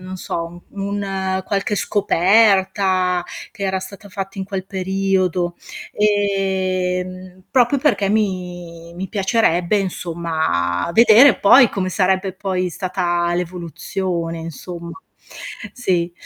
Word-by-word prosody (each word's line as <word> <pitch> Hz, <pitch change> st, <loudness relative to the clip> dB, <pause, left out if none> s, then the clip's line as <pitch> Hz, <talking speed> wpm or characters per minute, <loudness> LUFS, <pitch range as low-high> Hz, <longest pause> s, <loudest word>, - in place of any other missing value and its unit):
non 185 Hz, +1 st, -7 dB
so, 170 Hz, -1 st, -5 dB
u 200 Hz, -, -8 dB
un 195 Hz, -1 st, -2 dB
qualche 200 Hz, +1 st, -1 dB
scoperta 190 Hz, -2 st, +2 dB, 0.3 s
che 210 Hz, -4 st, -9 dB
era 190 Hz, -1 st, 0 dB
stata 200 Hz, +2 st, -10 dB
fatta 195 Hz, 0 st, -6 dB
in 190 Hz, -, -2 dB
quel 190 Hz, -1 st, -5 dB
periodo, 190 Hz, -2 st, 0 dB, 0.4 s
ehm, 185 Hz, -3 st, -1 dB
proprio 260 Hz, +1 st, +3 dB
perché 255 Hz, -8 st, +1 dB
mi 180 Hz, -5 st, -3 dB
mi 190 Hz, +2 st, -5 dB
piacerebbe 195 Hz, -2 st, +1 dB
insomma 165 Hz, -, -1 dB
vedere 230 Hz, +2 st, +7 dB
poi, 240 Hz, +4 st, +7 dB
come 185 Hz, -2 st, -2 dB
sarebbe 190 Hz, 0 st, +1 dB
poi 185 Hz, -1 st, -2 dB
stata 175 Hz, -2 st, -1 dB
l'evoluzione 175 Hz, 0 st, -3 dB
insomma. 170 Hz, +1 st, -8 dB, 0.8 s
Sì. 175 Hz, -7 st, -1 dB
185 Hz, 105 wpm, -20 LUFS, 175-200 Hz, 0.8 s, vedere